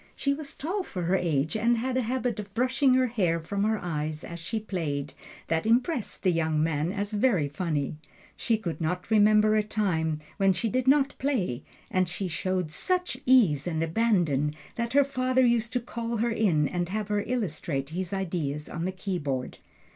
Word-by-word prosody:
She 280 - +1
was 280 -1 -6
tall 360 +8 -2
for 185 - -5
her 180 +3 +2
age, 160 -4 0
and 235 +2 +2
had 255 +2 -1
a 260 - +2
habit 245 -1 -1
of 200 -1 -7
brushing 255 +2 +3
her 255 0 +4
hair 190 -9 +1
from 200 +5 -2
her 220 +1 +2
eyes 155 -4 -3
as 170 0 -7
she 220 +7 -3
played, 150 -9 -3 0.3
that 165 +5 0
impressed 245 +2 +1
the 185 - +4
young 160 -2 +1
man 160 +1 0
as 205 +1 -3
very 205 - +2
funny. 150 -1 -2 0.4
She 225 - +1
could 175 -6 -5
not 180 +6 -2
remember 215 0 +5
a 215 - +4
time 165 -8 -1 0.2
when 195 -2 +4
she 225 +5 -1
did 255 +3 -1
not 275 0 +4
play: 205 - -1 0.3
and 185 -1 +1
she 185 +2 -3
showed 180 -1 -2
such 360 - -1
ease 185 - +5
and 160 -2 -1
abandon 165 -6 +1 0.2
that 235 0 -2
her 285 0 +6
father 255 -1 +1
used 235 -1 +2
to 250 - +2
call 235 0 -4
her 235 +2 +1
in 180 -10 +2
and 175 +1 -2
have 210 +1 -3
her 205 -1 +1
illustrate 160 - -2
his 175 +2 -4
ideas 165 -7 -2
on 170 0 -4
the 185 - -1
keyboard. 170 -9 -3
195 Hz, 190 wpm, -27 LUFS, 165-235 Hz, 0.4 s, her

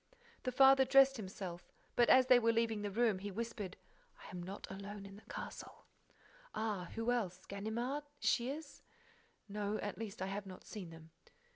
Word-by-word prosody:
The 255 - -1
father 270 +1 +7
dressed 270 0 +6
himself, 185 -4 -7 0.2
but, 240 -1 +5
as 255 0 +8
they 250 -1 +7
were 230 -1 +3
leaving 230 -2 +1
the 205 - -2
room, 220 -1 +2
he 205 +2 -4
whispered: 205 -2 -4 0.5
"I - - -9
am 180 -2 -5
not 190 +3 -6
alone 200 +1 -7
in 195 0 -10
the 210 - -13
castle—" - - -7 0.7
"Ah? 205 -5 -1
Who 225 +2 0
else? 185 -7 -1
Ganimard? 235 +8 -3
Shears?" 280 +5 -1 0.7
"No—at 205 0 -3
least, 220 -3 -5
I 190 - -1
have 195 +1 -4
not 185 -1 -10
seen 195 -5 -7
them." 165 0 -13
210 Hz, 165 wpm, -36 LUFS, 195-240 Hz, 0.7 s, as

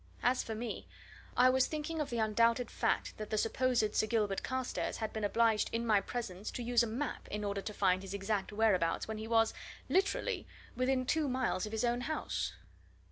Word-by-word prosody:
As 250 +1 +3
for 220 - -5
me, 235 +2 -5 0.5
I 255 +1 +7
was 260 0 +3
thinking 310 +1 -3
of 295 - -2
the 240 - -2
undoubted 230 +2 +2
fact - - 0
that 215 -1 -6
the 215 - 0
supposed 230 -1 +1
Sir 215 - +2
Gilbert 210 -3 +1
Carstairs 260 -1 -2
had 220 -1 -3
been 220 - -3
obliged 220 +1 +3
in 230 +1 -1
my 210 -3 +4
presence 210 -5 -5
to 245 - -4
use 240 0 +3
a 235 - +1
map 250 +5 -3
in 210 0 -4
order 200 -1 -1
to 210 - -5
find 185 -3 +2
his 195 0 -6
exact 200 0 -1
whereabouts 205 -6 +2
when 220 -1 -4
he 220 - -5
was, 225 -1 +3 0.4
literally, 390 +2 +1 0.3
within 255 0 +1
two 310 +3 +1
miles 255 -6 0
of - - -8
his 220 +2 0
own 240 +1 +1
house. 310 +5 -2
225 Hz, 200 wpm, -33 LUFS, 210-250 Hz, 0.5 s, I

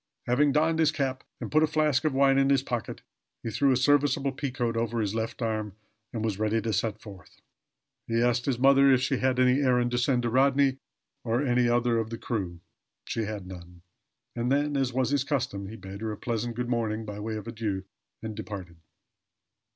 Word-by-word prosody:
Having 140 +3 +3
donned 160 +2 +2
his 155 -1 +4
cap, 135 -4 -2 0.2
and - - -6
put 155 - +4
a 155 - +4
flask 150 -2 +1
of 155 - +2
wine 135 0 +4
in 135 0 +3
his 135 -1 +3
pocket, 120 -5 -4 0.4
he 115 - -3
threw 135 +5 +2
a 130 - +3
serviceable 145 +1 +2
peacoat 130 -4 -2
over 115 0 -1
his 105 -2 -1
left 115 +2 -3
arm, 110 -3 -2 0.4
and 110 -2 -3
was 105 -3 -2
ready 110 +1 +1
to 110 0 -2
set 110 +2 -1
forth. 100 -4 -13 0.7
He 115 0 0
asked 120 +1 +1
his 130 -4 +1
mother 135 +1 +6
if 130 - +5
she 135 0 0
had 130 0 +1
any 130 +1 +4
errand 125 -2 +2
to 120 - +1
send 125 0 +1
to 120 - -1
Rodney, 135 +1 +3 0.5
or 120 +3 0
any 125 -1 +2
other 120 -1 +2
of 110 -1 -3
the 115 - -5
crew. 95 -8 -4 0.4
She 115 - -2
had 105 -3 -5
none. 90 -1 -11 0.5
And 120 +1 -1
then, 145 +1 +1
as 135 -2 +1
was 130 +1 0
his 140 -2 +2
custom, 130 -9 -2
he 110 - -8
bade 95 0 -9
her 110 -1 -2
a 105 - -6
pleasant 120 +1 -3
"good 125 +1 -2
morning," 115 -2 -1
by 105 -1 -6
way 110 +1 -4
of 110 +1 -7
adieu, 110 -5 -3 0.4
and 110 -1 -4
departed. 100 -5 -7
120 Hz, 210 wpm, -27 LUFS, 110-135 Hz, 0.7 s, mother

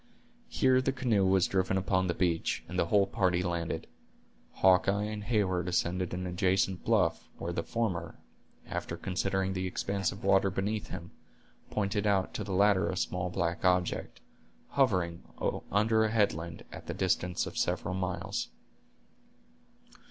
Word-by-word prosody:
Here 130 -1 +3
the 130 - +1
canoe 120 -7 +1
was 95 -1 +4
driven 95 0 +1
upon 95 0 +1
the 85 - -1
beach, 85 -2 0
and 90 +2 -3
the 85 - +2
whole 100 +2 +4
party 90 -2 +1
landed. 85 -2 -2 0.7
Hawkeye 95 +2 +4
and 105 0 -4
Heyward 95 -6 +1
ascended 90 0 0
an 90 +1 -3
adjacent 90 +1 +1
bluff, 105 -7 +1
where 85 - -4
the 85 - -1
former, 110 -4 -2 0.5
after - - -4
considering 95 0 -1
the 95 0 -2
expanse 95 +1 -1
of 100 +5 -10
water 95 0 +4
beneath 100 +3 -2
him, 85 -1 -7 0.6
pointed 105 0 0
out 95 -2 +1
to 105 - -3
the 100 - -6
latter 100 0 +4
a 95 - -3
small 90 0 -1
black 85 -1 -2
object, 90 -1 +1 0.5
hovering 90 -11 +1 0.5
under 110 +2 +3
a 110 - +2
headland, 85 -6 0
at - - -10
the - - -4
distance 90 -1 0
of - - -7
several - - -1
miles. 95 -1 -2
95 Hz, 150 wpm, -30 LUFS, 90-100 Hz, 0.7 s, was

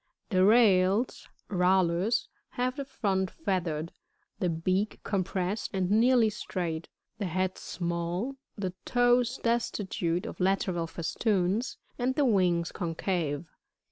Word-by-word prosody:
58. 185 - +2
The 185 - +6
Rails, 205 0 +4
— - - -37
Rallus, 185 +3 +3
— - - -46
have 250 +1 0
the 280 - -3
front 190 -7 -1
feathered, 170 - -2 0.5
the 180 - +1
bealr 185 +5 0
compressed 190 +1 -1
and 185 0 0
nearly 230 0 +5
straight, 170 -5 -4 0.3
the 200 - -1
head 185 +2 -1
small, 175 +8 -3 0.2
the 190 -3 -3
toes 245 0 +3
destitute 195 -7 0
of - - -7
lateral 185 -2 +1
festoons, 190 +5 0 0.2
and 255 +2 +1
the 290 - +3
wings 180 -7 +2
concave. 165 -3 -2
190 Hz, 125 wpm, -29 LUFS, 175-225 Hz, 0.5 s, The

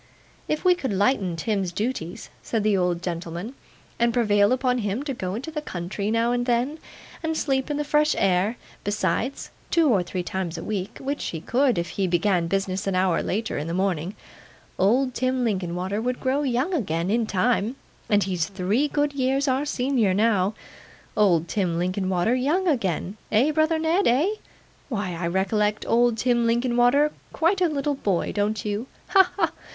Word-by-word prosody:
'If 305 +4 -2
we 365 - +7
could 280 -10 -3
lighten 200 -3 +1
Tim's 195 0 -1
duties,' 205 -2 -4
said 225 -3 -2
the 210 -1 +3
old 180 -2 0
gentleman, 175 +5 -4 0.5
'and 235 0 +3
prevail 205 -3 +3
upon 255 -1 +1
him 210 +4 -2
to 285 -2 -3
go 185 -5 -4
into 270 +8 -5
the 305 -1 -3
country, 195 - -4
now 230 +2 +2
and 245 0 -1
then, 250 +6 0 0.4
and 320 -1 -1
sleep 265 -2 0
in 295 - -1
the 295 - 0
fresh 300 +1 +2
air, 195 +4 +2 0.3
besides, 205 +5 -1 0.2
two 330 -3 +3
or 205 -7 +3
three 180 +1 -4
times 180 -2 -3
a 165 - -6
week 200 -3 -4
(which 280 +2 -3
he 165 - -3
could, 250 - +1
if 170 -1 -1
he 190 +3 -1
began 175 -1 +1
business 195 +2 -1
an 195 - 0
hour 185 -2 +2
later 220 -2 -2
in 150 - -4
the 165 - -2
morning), 185 0 -1 0.6
old 250 +7 +3
Tim 255 0 0
Linkinwater 190 -1 -1
would 250 +1 -2
grow 265 +2 0
young 270 +6 0
again 180 - -1
in 230 0 +1
time; 220 +4 +1 0.3
and 205 -1 +4
he's 180 -4 -1
three 200 +8 0
good 290 0 0
years 270 +1 +1
our 265 +2 +1
senior 250 -8 +1
now. 205 -2 +2 0.6
Old 175 -6 +3
Tim 180 -5 -1
Linkinwater 185 +3 0
young 300 +9 +1
again! 200 - -1
Eh, 245 +8 +4
brother 315 +1 +2
Ned, 325 +5 +2
eh? 275 +10 +3 0.6
Why, 205 -7 -2
I 170 0 -3
recollect 210 +4 0
old 240 0 +3
Tim 240 0 +2
Linkinwater 245 +5 +3 0.2
quite 370 +4 +2
a 355 - +4
little 290 -1 -1
boy, 200 -10 -1
don't 205 0 -1
you? 210 +4 -2 0.2
Ha, 390 - +7
ha, 370 - -1
ha! - - -7
220 Hz, 180 wpm, -24 LUFS, 185-265 Hz, 0.6 s, we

